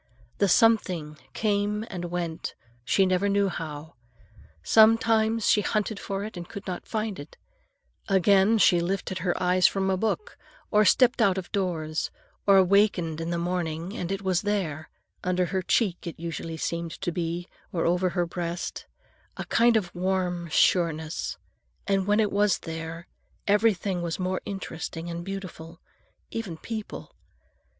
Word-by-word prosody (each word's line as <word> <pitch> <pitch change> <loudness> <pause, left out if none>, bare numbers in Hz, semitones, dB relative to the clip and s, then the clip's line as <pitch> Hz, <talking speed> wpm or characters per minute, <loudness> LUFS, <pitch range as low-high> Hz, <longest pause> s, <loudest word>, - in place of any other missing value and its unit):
The 200 - +4
something 180 - +2
came 210 0 0
and 175 -2 -5
went, 170 -2 -4 0.3
she 195 +10 +3
never 185 +2 +1
knew 200 0 +2
how. 155 -3 -6 0.7
Sometimes 225 - +4
she 210 - +5
hunted 210 0 -1
for 195 0 -4
it 215 0 -7
and 175 -1 -7
could 200 - -8
not 180 -2 -5
find 215 -4 -3
it; 145 +2 -11 0.7
again, 195 +3 +4
she 180 -3 +5
lifted 185 +1 -2
her 175 0 -1
eyes 180 0 +4
from 190 -1 0
a 190 - +1
book, 225 - -2 0.3
or 210 0 +5
stepped 250 +3 +4
out 195 -1 +4
of 185 - -5
doors, 160 -5 -1 0.4
or 195 -1 +7
wakened 180 -4 +2
in 165 - -3
the 170 - -1
morning, 170 +1 -2
and 180 -3 -3
it 195 0 -3
was 185 -2 +1
there,—under 180 -1 -2
her 190 +2 -1
cheek, 185 -2 0
it 170 - -7
usually 165 -1 -5
seemed 170 0 -3
to 175 - -1
be, 170 +1 -3 0.2
or 165 - -1
over 180 +2 +2
her 175 -1 0
breast,—a 170 0 -7
kind 235 0 +4
of 180 -5 -3
warm 180 -1 -1
sureness. 160 -1 +1 0.5
And 195 -1 +1
when 210 +1 +3
it 215 -2 +2
was 205 -1 +3
there, 165 +1 -6 0.4
everything 200 -3 +2
was 170 -1 -2
more 185 0 -2
interesting 170 -3 -5
and 170 0 -5
beautiful, 175 -4 -7 0.5
even 210 -8 -4
people. 220 +3 -7
185 Hz, 150 wpm, -26 LUFS, 170-200 Hz, 0.7 s, or